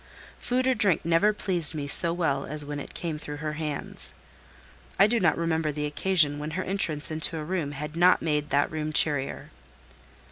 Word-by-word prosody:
Food 255 Hz, +1 st, -1 dB
or 260 Hz, -, +3 dB
drink 200 Hz, -10 st, +2 dB
never 170 Hz, +5 st, +3 dB
pleased 180 Hz, -7 st, -2 dB
me 145 Hz, -2 st, -3 dB
so 165 Hz, +4 st, +1 dB
well 160 Hz, -6 st, -1 dB
as 150 Hz, 0 st, -2 dB
when 145 Hz, 0 st, -5 dB
it -, -, -9 dB
came 160 Hz, -3 st, -4 dB
through 150 Hz, -1 st, -7 dB
her 150 Hz, +1 st, -4 dB
hands. 150 Hz, -2 st, -5 dB, 0.8 s
I 195 Hz, -, +7 dB
do 230 Hz, +2 st, +1 dB
not 175 Hz, -6 st, +2 dB
remember 160 Hz, -2 st, 0 dB
the 150 Hz, 0 st, -3 dB
occasion 150 Hz, -1 st, +3 dB
when 150 Hz, +1 st, -4 dB
her 185 Hz, -, -1 dB
entrance 165 Hz, -6 st, +1 dB
into 160 Hz, +1 st, +1 dB
a 155 Hz, -, -4 dB
room 160 Hz, -3 st, -3 dB
had 150 Hz, +2 st, -6 dB
not 175 Hz, +2 st, +5 dB
made 150 Hz, -2 st, -1 dB
that 145 Hz, 0 st, +1 dB
room 155 Hz, 0 st, -3 dB
cheerier. 145 Hz, -3 st, +1 dB
155 Hz, 190 wpm, -26 LUFS, 150-175 Hz, 0.8 s, I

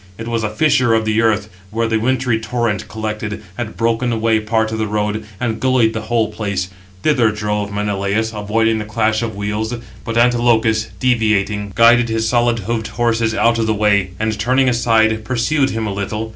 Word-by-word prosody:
It 115 Hz, -, -7 dB
was 115 Hz, -1 st, -1 dB
a 110 Hz, -, 0 dB
fissure 125 Hz, 0 st, +2 dB
of 110 Hz, 0 st, 0 dB
the 110 Hz, +1 st, +1 dB
earth, 110 Hz, -2 st, +1 dB, 0.2 s
where 115 Hz, +3 st, -1 dB
the 110 Hz, -1 st, 0 dB
wintry 125 Hz, -1 st, 0 dB
torrent 115 Hz, -2 st, -2 dB
collected, 110 Hz, -1 st, -5 dB
had 110 Hz, -1 st, -5 dB
broken 115 Hz, +1 st, 0 dB
away 110 Hz, -1 st, +1 dB
[part] 110 Hz, 0 st, 0 dB
of 110 Hz, -, -3 dB
the 110 Hz, -, 0 dB
road, 105 Hz, +1 st, -2 dB, 0.2 s
and 115 Hz, -2 st, -2 dB
gullied 130 Hz, -4 st, +2 dB
the 110 Hz, -, -3 dB
whole 115 Hz, -2 st, +1 dB
place; 100 Hz, -4 st, -3 dB, 0.3 s
thither 125 Hz, -7 st, +3 dB
drove 105 Hz, -1 st, -2 dB
Menelaus, 105 Hz, +2 st, -1 dB
avoiding 110 Hz, +2 st, 0 dB
the 105 Hz, -, -4 dB
clash 110 Hz, +1 st, 0 dB
of 115 Hz, -3 st, -3 dB
wheels. 105 Hz, +3 st, -2 dB, 0.3 s
But 115 Hz, 0 st, -3 dB
Antilochus, 115 Hz, -2 st, +3 dB
deviating, 105 Hz, -5 st, 0 dB
guided 120 Hz, +1 st, +5 dB
his 110 Hz, 0 st, 0 dB
solid 120 Hz, 0 st, +2 dB
hoofed 115 Hz, -1 st, -2 dB
horses 115 Hz, -1 st, 0 dB
out 115 Hz, 0 st, +2 dB
of 110 Hz, -, 0 dB
the 110 Hz, -, +1 dB
way, 100 Hz, -2 st, +2 dB
and 110 Hz, -1 st, -1 dB
turning 130 Hz, +4 st, +2 dB
aside, 110 Hz, -3 st, +2 dB
pursued 130 Hz, +4 st, +1 dB
him 110 Hz, -2 st, -3 dB
a 105 Hz, -, -2 dB
little. 105 Hz, +2 st, -4 dB
110 Hz, 185 wpm, -18 LUFS, 105-115 Hz, 0.3 s, guided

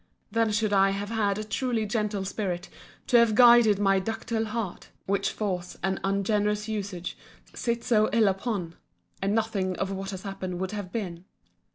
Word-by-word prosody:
then 230 Hz, -1 st, +2 dB
should 210 Hz, 0 st, +1 dB
I 195 Hz, 0 st, +5 dB
have 200 Hz, +1 st, -3 dB
had 205 Hz, -3 st, +1 dB
a 215 Hz, -, -3 dB
truly 230 Hz, 0 st, -1 dB
gentle 210 Hz, -2 st, -1 dB
spirit 190 Hz, -3 st, -3 dB, 0.4 s
to 245 Hz, -, +4 dB
have 230 Hz, -2 st, +4 dB
guided 235 Hz, -3 st, +7 dB
my 195 Hz, -1 st, +3 dB
ductile 225 Hz, +2 st, -2 dB
heart, 215 Hz, -4 st, -4 dB, 0.2 s
which 200 Hz, 0 st, +1 dB
force 180 Hz, -4 st, -3 dB
and 190 Hz, +1 st, 0 dB
ungenerous 205 Hz, +2 st, 0 dB
usage 200 Hz, -5 st, -4 dB, 0.4 s
sit 235 Hz, -1 st, -2 dB
so 215 Hz, -3 st, +3 dB
ill 225 Hz, -2 st, +4 dB
upon: 195 Hz, -3 st, -2 dB, 0.5 s
and 200 Hz, +2 st, +1 dB
nothing 205 Hz, -5 st, 0 dB
of 195 Hz, 0 st, -2 dB
what 195 Hz, 0 st, -4 dB
has 190 Hz, -2 st, -6 dB
happened 190 Hz, -3 st, -5 dB
would 190 Hz, +1 st, -2 dB
have 205 Hz, -4 st, -5 dB
been. 180 Hz, -6 st, -4 dB
205 Hz, 170 wpm, -27 LUFS, 195-220 Hz, 0.5 s, guided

